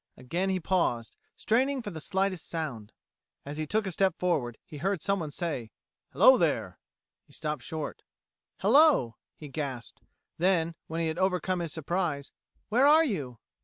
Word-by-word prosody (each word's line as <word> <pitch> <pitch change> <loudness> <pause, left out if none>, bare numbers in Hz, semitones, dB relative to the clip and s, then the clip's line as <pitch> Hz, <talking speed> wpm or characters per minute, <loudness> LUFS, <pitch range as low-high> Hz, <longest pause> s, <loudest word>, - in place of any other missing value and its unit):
Again 170 +10 -2
he 190 -1 0
paused, 160 -11 0 0.2
straining 260 +4 +1
for 205 - -5
the 160 -2 -7
slightest 190 +1 -1
sound. 140 -11 -4 0.5
As 145 +1 -6
he 155 0 -3
took 215 +4 0
a 190 - -2
step 190 0 +2
forward 140 -10 0
he 150 - -10
heard 190 +4 0
someone 190 -3 -1
say: 145 -7 -4 0.4
"Hello, - - +7
there!" - - 0 0.5
He - - -20
stopped 150 -3 -3
short. 155 +4 -5 0.6
"Hello," 285 - +4 0.2
he 150 - -9
gasped; 135 -4 -6 0.4
then, 170 -2 +2
when 165 +1 -3
he 165 - 0
had 160 +2 -3
overcome 185 -1 +1
his 170 -3 -3
surprise, 160 -2 -2 0.4
"Where 250 +6 +4
are 310 +2 +7
you?" 140 - -3
170 Hz, 160 wpm, -29 LUFS, 145-190 Hz, 0.6 s, Hello